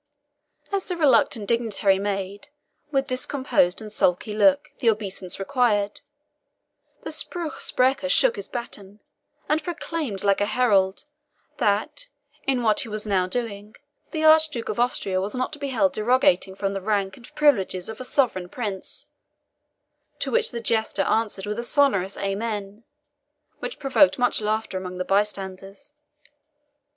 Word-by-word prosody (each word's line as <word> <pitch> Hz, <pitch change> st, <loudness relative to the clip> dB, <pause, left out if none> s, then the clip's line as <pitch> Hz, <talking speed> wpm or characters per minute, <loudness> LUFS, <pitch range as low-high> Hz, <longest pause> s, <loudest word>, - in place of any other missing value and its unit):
As 395 Hz, -1 st, -1 dB
the 360 Hz, -, -3 dB
reluctant 235 Hz, -8 st, +3 dB
dignitary 215 Hz, -4 st, +2 dB
made, 200 Hz, +4 st, -4 dB, 0.4 s
with 270 Hz, -2 st, +1 dB
discomposed 255 Hz, -7 st, 0 dB
and 215 Hz, -, -9 dB
sulky 180 Hz, +2 st, +1 dB
look, 285 Hz, +7 st, +3 dB
the 235 Hz, -, +3 dB
obeisance 195 Hz, -4 st, -2 dB
required, 210 Hz, -2 st, 0 dB, 1.0 s
the -, -, -5 dB
SPRUCH 340 Hz, -3 st, -3 dB
SPRECHER 265 Hz, +2 st, +1 dB
shook -, -, +4 dB
his 405 Hz, -, -6 dB
baton, 210 Hz, -4 st, -7 dB, 0.5 s
and 310 Hz, +1 st, +1 dB
proclaimed, 330 Hz, -, -4 dB
like 200 Hz, 0 st, +2 dB
a 205 Hz, -, +2 dB
herald, 200 Hz, -6 st, +2 dB, 0.5 s
that, 210 Hz, -, 0 dB, 0.4 s
in 260 Hz, -3 st, +1 dB
what 215 Hz, -2 st, +3 dB
he 235 Hz, -, -1 dB
was 215 Hz, 0 st, -2 dB
now 190 Hz, -3 st, +1 dB
doing, 210 Hz, -1 st, -4 dB, 0.3 s
the 315 Hz, -2 st, -3 dB
Archduke 310 Hz, -6 st, +4 dB
of -, -, -3 dB
Austria 195 Hz, -6 st, 0 dB
was 200 Hz, +4 st, -3 dB
not 255 Hz, +3 st, -2 dB
to 300 Hz, -, -6 dB
be 280 Hz, -, -3 dB
held 280 Hz, +2 st, +2 dB
derogating 215 Hz, -6 st, +2 dB
from 195 Hz, 0 st, -2 dB
the 195 Hz, -, -4 dB
rank 195 Hz, -1 st, -1 dB
and 240 Hz, -, -16 dB
privileges 195 Hz, -11 st, +2 dB
of 220 Hz, +2 st, -7 dB
a -, -, -4 dB
sovereign 230 Hz, -10 st, 0 dB
prince; 205 Hz, -5 st, -5 dB, 1.1 s
to -, -, -2 dB
which 465 Hz, -1 st, +2 dB
the 235 Hz, -, -5 dB
jester 220 Hz, -3 st, 0 dB
answered 210 Hz, -3 st, 0 dB
with 210 Hz, +2 st, -3 dB
a -, -, -2 dB
sonorous 240 Hz, -8 st, +2 dB
AMEN, 205 Hz, +1 st, -3 dB, 0.8 s
which -, -, -5 dB
provoked 280 Hz, +1 st, +3 dB
much 245 Hz, -3 st, +2 dB
laughter 215 Hz, -2 st, -1 dB
among 180 Hz, -1 st, -7 dB
the 185 Hz, -, -3 dB
bystanders. 195 Hz, +5 st, -2 dB
220 Hz, 145 wpm, -24 LUFS, 195-270 Hz, 1.1 s, shook